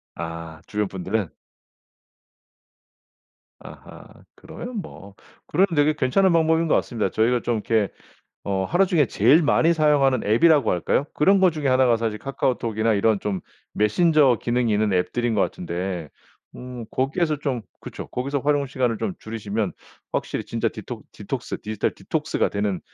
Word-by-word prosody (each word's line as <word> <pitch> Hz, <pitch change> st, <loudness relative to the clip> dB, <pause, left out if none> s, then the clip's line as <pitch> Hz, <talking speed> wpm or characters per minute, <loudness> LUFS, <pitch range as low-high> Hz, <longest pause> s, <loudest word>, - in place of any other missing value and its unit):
아. 80 Hz, -1 st, -7 dB
주변분들은? 100 Hz, -1 st, -2 dB, 2.3 s
아하. -, -, -12 dB, 0.3 s
그러면 245 Hz, -1 st, -8 dB
뭐 100 Hz, -, -12 dB, 0.3 s
그러면 190 Hz, +6 st, +3 dB
되게 150 Hz, +1 st, +3 dB
괜찮은 180 Hz, +9 st, +2 dB
방법인 160 Hz, 0 st, +3 dB
것 -, -, +3 dB
같습니다. 110 Hz, -6 st, 0 dB
저희가 120 Hz, +4 st, +1 dB
좀 120 Hz, -, -1 dB
이렇게 110 Hz, -2 st, 0 dB, 0.5 s
어 95 Hz, -1 st, -1 dB
하루 180 Hz, -, +3 dB
중에 170 Hz, -7 st, +3 dB
제일 140 Hz, -, +4 dB
많이 165 Hz, +3 st, +3 dB
사용하는 145 Hz, -5 st, +3 dB
앱이라고 135 Hz, +4 st, +4 dB
할까요? 90 Hz, -, 0 dB
그런 195 Hz, +6 st, +4 dB
것 185 Hz, -2 st, +5 dB
중에 150 Hz, -3 st, -3 dB
1 130 Hz, 0 st, +4 dB
가 120 Hz, -2 st, +3 dB
사실 110 Hz, -2 st, -2 dB
카카오톡이나 115 Hz, -5 st, -1 dB
이런 105 Hz, 0 st, +2 dB
좀 100 Hz, -3 st, -3 dB, 0.3 s
메신저 135 Hz, -, +3 dB
기능이 120 Hz, -1 st, 0 dB
있는 105 Hz, -1 st, +1 dB
앱들인 115 Hz, +6 st, 0 dB
것 100 Hz, -, +2 dB
같은데 90 Hz, -2 st, -3 dB, 0.5 s
어 125 Hz, -2 st, -8 dB
거기에서 150 Hz, +3 st, 0 dB
좀 135 Hz, -5 st, -2 dB, 0.2 s
그쵸. -, -, -8 dB
거기서 140 Hz, +3 st, -2 dB
활용 145 Hz, +1 st, +1 dB
시간을 125 Hz, -4 st, -1 dB
좀 190 Hz, -, -2 dB
줄이시면 110 Hz, -2 st, -3 dB, 0.4 s
확실히 -, -, -2 dB
진짜 -, -, -1 dB
디톡 -, -, -8 dB
디톡스 -, -, -5 dB
디지털 110 Hz, -1 st, -2 dB
디톡스가 -, -, -1 dB
되는 100 Hz, -2 st, -1 dB
120 Hz, 330 characters per minute, -23 LUFS, 105-150 Hz, 2.3 s, 것